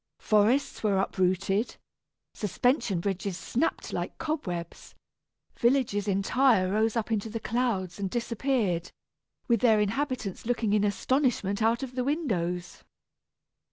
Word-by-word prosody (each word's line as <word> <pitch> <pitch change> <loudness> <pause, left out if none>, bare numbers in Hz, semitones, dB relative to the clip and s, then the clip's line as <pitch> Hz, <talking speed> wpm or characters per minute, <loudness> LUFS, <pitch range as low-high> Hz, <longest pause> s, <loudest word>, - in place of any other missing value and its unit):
Forests 220 +6 +2
were 205 -3 +2
uprooted, 195 +3 0 0.6
suspension 220 - 0
bridges 195 -1 -2
snapped 275 +11 -2
like - - -3
cobwebs, 195 - -4 0.6
villages 235 -5 +1
entire 195 0 +3
rose 220 +2 +1
up 230 -1 -2
into 220 0 -1
the 225 +1 -4
clouds 220 -7 -1
and 195 -1 -2
disappeared, 230 -6 -1 0.6
with 235 -2 +3
their 220 -2 +4
inhabitants 225 -1 -2
looking 235 -4 +1
in 210 -1 +3
astonishment 215 -1 +1
out 230 +4 +2
of 255 -1 -6
the 250 0 -1
windows! 180 - -2
215 Hz, 120 wpm, -28 LUFS, 195-245 Hz, 0.6 s, their